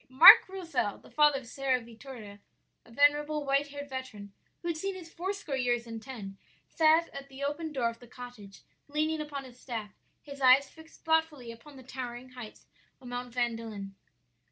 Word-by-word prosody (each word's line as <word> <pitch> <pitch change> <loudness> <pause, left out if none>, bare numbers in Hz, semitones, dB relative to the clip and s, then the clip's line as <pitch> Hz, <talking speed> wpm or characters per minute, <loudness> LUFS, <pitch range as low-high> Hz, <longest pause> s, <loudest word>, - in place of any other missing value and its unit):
"Marc 265 +7 +10
Rozel, 335 - -2
the - - -18
father 295 -2 +4
of - - -15
Sara 260 +1 0
Vittoria, 230 -3 -11 0.5
a - - -18
venerable, 295 +3 +3
white 275 +1 +2
haired 285 0 -7
veteran 255 -7 -7 0.3
who 340 - -2
had 335 - 0
seen 390 +4 -3
his 335 -3 -11
four 365 +3 -2
score 390 -8 -4
years 245 -2 0
and 225 -1 -7
ten, 210 -7 -8 0.3
sat 320 +1 +4
at 275 0 -9
the 270 +1 -8
open 300 +3 -2
door 245 -5 0
of 230 - -15
the 245 - -14
cottage, 240 -5 -11 0.2
leaning 305 +2 0
upon 290 -2 -5
his 250 -1 -14
staff, 225 -6 -5 0.3
his 280 -1 -10
eyes 265 +2 +6
fixed 320 +2 -17
thoughtfully 320 -6 +1
upon 270 +5 -14
the 260 - -12
towering 250 -1 -7
heights 245 -4 -11 0.3
of 250 - -11
Mount 245 0 -5
Vandelin. 225 -5 -3
265 Hz, 180 wpm, -30 LUFS, 235-300 Hz, 0.5 s, Marc